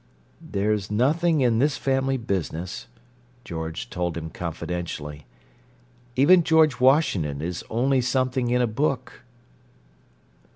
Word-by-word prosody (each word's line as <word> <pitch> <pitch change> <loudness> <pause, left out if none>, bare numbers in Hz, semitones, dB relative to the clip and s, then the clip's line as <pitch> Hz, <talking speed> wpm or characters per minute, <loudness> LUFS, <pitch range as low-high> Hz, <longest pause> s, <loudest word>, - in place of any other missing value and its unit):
"There's 100 0 -1
nothing 150 +8 +2
in 120 -3 +3
this 145 +2 +2
family 135 0 0
business," 90 - -4 0.6
George 80 +7 -5
told 85 -2 -2
him 80 -1 -6
confidentially. 80 -4 -5 0.9
"Even 170 +7 +6
George 160 -6 +3
Washington 125 - +2
is 85 +3 -4
only 130 +3 +2
something 130 0 0
in 125 0 +2
a - - +4
book." 130 +2 -2
120 Hz, 110 wpm, -24 LUFS, 90-135 Hz, 0.9 s, Even